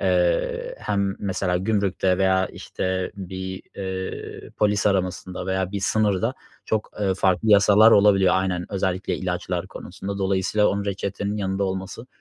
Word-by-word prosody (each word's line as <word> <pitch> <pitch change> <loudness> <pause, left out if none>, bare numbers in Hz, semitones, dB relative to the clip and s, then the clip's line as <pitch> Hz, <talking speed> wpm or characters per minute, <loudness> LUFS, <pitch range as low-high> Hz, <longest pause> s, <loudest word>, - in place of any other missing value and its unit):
eee, - - +1
hem 100 -1 -1
mesela 95 -2 -1
gümrükte 95 -2 +1
veya, 95 0 +3
işte, 95 0 -3
bir, 95 0 -6
eee, 95 -1 -5
polis 105 -1 +2
aramasında 90 -1 -1
veya 95 0 -1
bir 100 - -2
sınırda 110 +3 +1 0.3
çok, 110 -1 -2
eee, 95 -2 +1
farklı 95 +3 +1
yasalar 105 +2 +7
olabiliyor. 100 -3 +5
Aynen. 90 -2 -1
Özellikle 95 -1 -1
ilaçlar 90 -1 -3
konusunda. 95 +1 -7
Dolayısıyla 95 +2 +1
onun, 100 0 -1
reçetenin 100 +1 -3
yanında 95 0 -1
olması 95 +5 -5
95 Hz, 135 wpm, -23 LUFS, 95-105 Hz, 0.3 s, yasalar